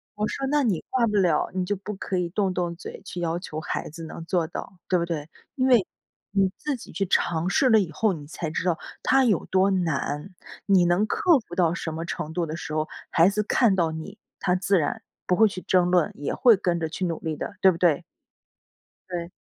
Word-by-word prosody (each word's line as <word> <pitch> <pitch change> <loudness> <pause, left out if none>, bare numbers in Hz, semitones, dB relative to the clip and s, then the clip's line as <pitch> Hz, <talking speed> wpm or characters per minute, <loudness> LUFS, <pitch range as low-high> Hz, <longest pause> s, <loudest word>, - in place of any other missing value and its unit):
“我 210 +1 -1
说： 270 - -3
“那 295 0 +3
你 205 -10 0
挂 240 -3 +2
不 210 - -1
了， 175 -6 +2
你 185 0 -1
就 205 - -1
不 210 +2 -6
可 190 0 -3
以 180 -1 0
动 195 +1 0
动 175 -1 -2
嘴 185 - -9
去 175 - -6
要 170 0 -1
求 155 -3 -6
孩 - - -3
子 165 +2 -9
能 165 +1 -8
做 170 -2 +1
到， 190 - -7
对 180 -2 +3
不 170 - 0
对？ 160 -3 -4 0.3
因 260 -1 +1
为 240 -7 +5 0.5
你 195 -1 +3
自 295 -2 -2
己 240 - -12
去 195 - -1
尝 170 +1 +1
试 265 - +3
了 225 - +6
以 185 -6 -1
后 210 +5 +1
你 150 -4 -8
才 160 +1 -4
知 160 - -2
道 175 -3 +2 0.3
它 265 0 +4
有 210 -8 +2
多 190 +1 +3
难。 170 0 -1 0.3
你 190 -3 +5
能 175 +5 +3
克 365 -9 +3
服 175 - -8
到 170 -2 +3
什 165 - -4
么 165 +1 -4
程 155 -2 -4
度 170 -1 0
的 155 +1 -5
时 155 - -6
候， 155 0 0 0.2
孩 165 +1 +5
子 210 +1 0
看 215 -1 +3
到 170 -3 +1
你 160 +6 -7 0.2
他 180 0 +1
自 195 +1 +2
然 225 +9 -2 0.3
不 180 - +3
会 220 0 +6
去 185 -2 -6
争 180 -1 +2
论， 180 -3 +3
也 145 - -3
会 235 -4 +6
跟 175 -2 0
着 160 - -1
去 185 +3 -3
努 165 -2 -2
力 160 -2 -3
的， 205 - -5
对 190 - +7
不 165 - -5
对？“ 165 -4 +2 1.1
对。 175 -1 -4
180 Hz, 255 characters per minute, -25 LUFS, 165-200 Hz, 1.1 s, 对